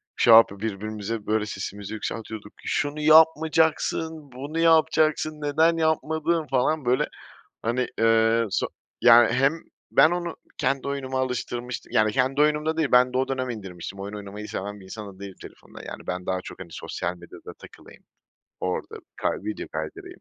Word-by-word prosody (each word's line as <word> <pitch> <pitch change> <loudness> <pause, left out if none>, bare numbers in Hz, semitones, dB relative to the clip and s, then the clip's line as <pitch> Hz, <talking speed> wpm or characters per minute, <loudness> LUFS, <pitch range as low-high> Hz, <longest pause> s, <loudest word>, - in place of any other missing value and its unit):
Şey 115 - +5
yapıp 100 -3 +6
birbirimize 110 0 -4
böyle 110 0 0
sesimizi 100 0 -6
yükseltiyorduk. 110 -1 -6
"Şunu 145 +1 -1
yapmayacaksın, 160 -1 +3
bunu 140 +6 -5
yapacaksın, 155 -1 +3
neden 160 +3 +2
yapmadın?" 160 0 0
falan 135 +2 +1
böyle 125 +1 +2 0.5
hani, 120 +2 0
eee, 115 0 +4
so 95 - 0 0.3
yani 120 -1 +7
hem 135 +4 +3 0.4
ben 155 - +6
onu 175 -1 -3 0.2
kendi 135 +2 -1
oyunuma 130 -2 -3
alıştırmıştım. 125 -1 -4
Yani 110 0 +3
kendi 135 +3 +1
oyunum 150 0 +2
da 160 0 -1
değil 155 -4 +1
ben 125 0 +5
de - - 0
o 130 +1 +1
dönem 130 -1 -2
indirmiştim. 95 -4 -7
Oyun 100 +1 -6
oynamayı 105 +1 -8
seven 100 +1 -5
bir 95 - -14
insan 100 0 -8
da - - -20
değilim 100 -2 -8
telefonda. - - -13
Yani - - -9
ben 90 0 -3
daha 95 0 -1
çok - - -10
hani 95 -3 -9
sosyal 85 +2 -4
medyada 85 0 -12
takılayım - - -16 0.6
orada 90 0 -3 0.2
kay - - 0
video 105 0 -5
kaydırayım. 80 0 -7
125 Hz, 160 wpm, -25 LUFS, 105-150 Hz, 0.6 s, yani